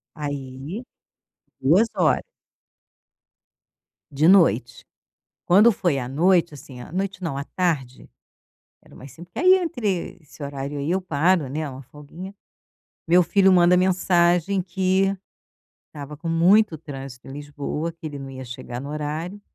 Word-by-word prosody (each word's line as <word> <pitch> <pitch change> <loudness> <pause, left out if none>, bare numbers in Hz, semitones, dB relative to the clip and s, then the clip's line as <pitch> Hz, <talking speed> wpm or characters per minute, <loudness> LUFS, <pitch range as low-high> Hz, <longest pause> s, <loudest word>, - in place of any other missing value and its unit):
Aí 145 - -6 0.8
2 180 - +4
hora. - - +2 1.9
De 150 +4 +2
noite. 120 - +3 0.6
Quando 210 +6 +6
foi 170 -8 0
à 125 - -4
noite 170 +3 +2
assim, 130 -3 -11
à - - -11
noite, 190 +1 -3
não, 155 -5 -3
à 140 - -3
tarde, 145 -7 -3 0.7
era - - -18
mais 135 +1 -12
cin 165 - -12
que 175 - -19
ai 370 +3 +6
entre 245 - -2
esse 150 -1 -12
horário 140 +1 -5
aí 140 +4 -2
eu 190 +1 0
paro, 170 -1 +1
né, 150 +3 -3
uma 130 0 -9
folguinha. 155 +9 -11 0.7
Meu 175 +2 +6
filho 190 +2 +4
manda 180 -1 +5
mensagem 180 0 +2
que 190 +2 0 0.7
estava 150 -1 -9
com 165 +2 -7
muito 175 +2 +4
trânsito 135 -5 -9
em - - -8
Lisboa, 145 +3 -5
que 165 -1 -14
ele 145 -2 -6
não 135 0 -8
ia 130 -1 -8
chegar 120 0 -7
no 140 - -7
horário, 155 +6 -5
160 Hz, 145 wpm, -23 LUFS, 140-185 Hz, 1.9 s, Quando